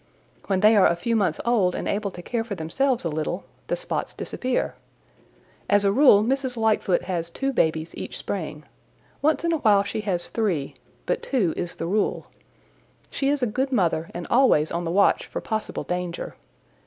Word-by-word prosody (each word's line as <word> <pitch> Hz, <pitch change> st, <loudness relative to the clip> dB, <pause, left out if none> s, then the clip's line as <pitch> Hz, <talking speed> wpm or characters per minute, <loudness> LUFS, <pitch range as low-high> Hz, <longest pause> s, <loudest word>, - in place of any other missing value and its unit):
"When 190 Hz, -2 st, +1 dB
they 215 Hz, +1 st, +6 dB
are 200 Hz, -, +6 dB
a 170 Hz, -, +2 dB
few 230 Hz, +7 st, -1 dB
months 185 Hz, -8 st, +1 dB
old 210 Hz, -7 st, +2 dB
and -, -, -3 dB
able 205 Hz, 0 st, -1 dB
to 175 Hz, -2 st, -10 dB
care 235 Hz, +3 st, -2 dB
for 225 Hz, -3 st, -5 dB
themselves 235 Hz, +9 st, 0 dB
a -, -, +2 dB
little, 155 Hz, +4 st, -3 dB, 0.2 s
the -, -, 0 dB
spots -, -, -4 dB
disappear. 255 Hz, 0 st, -2 dB, 1.0 s
As 205 Hz, 0 st, +4 dB
a 200 Hz, -, +4 dB
rule 235 Hz, -4 st, +6 dB
Mrs. 260 Hz, +1 st, -1 dB
Lightfoot 215 Hz, -5 st, +2 dB
has 175 Hz, -2 st, -2 dB
two 270 Hz, +9 st, -2 dB
babies 160 Hz, -5 st, 0 dB
each -, -, -6 dB
spring. 155 Hz, -5 st, -5 dB, 0.6 s
Once 310 Hz, +3 st, +2 dB
in 335 Hz, -, +1 dB
a -, -, +2 dB
while 205 Hz, -7 st, +4 dB
she 200 Hz, +2 st, -3 dB
has 185 Hz, -4 st, -1 dB
three, 185 Hz, -11 st, -1 dB, 0.3 s
but -, -, -1 dB
two 210 Hz, -, 0 dB
is 175 Hz, -1 st, -4 dB
the -, -, -4 dB
rule. 200 Hz, +5 st, 0 dB, 0.9 s
She 275 Hz, -, 0 dB
is 285 Hz, -2 st, 0 dB
a -, -, +5 dB
good 260 Hz, +5 st, -1 dB
mother 170 Hz, -8 st, +1 dB
and 175 Hz, 0 st, -6 dB
always 235 Hz, -, +4 dB
on 170 Hz, +1 st, -2 dB
the -, -, -2 dB
watch 200 Hz, +3 st, +3 dB
for -, -, -4 dB
possible 220 Hz, -1 st, -3 dB
danger. 180 Hz, -1 st, -4 dB
200 Hz, 190 wpm, -24 LUFS, 175-240 Hz, 1.0 s, they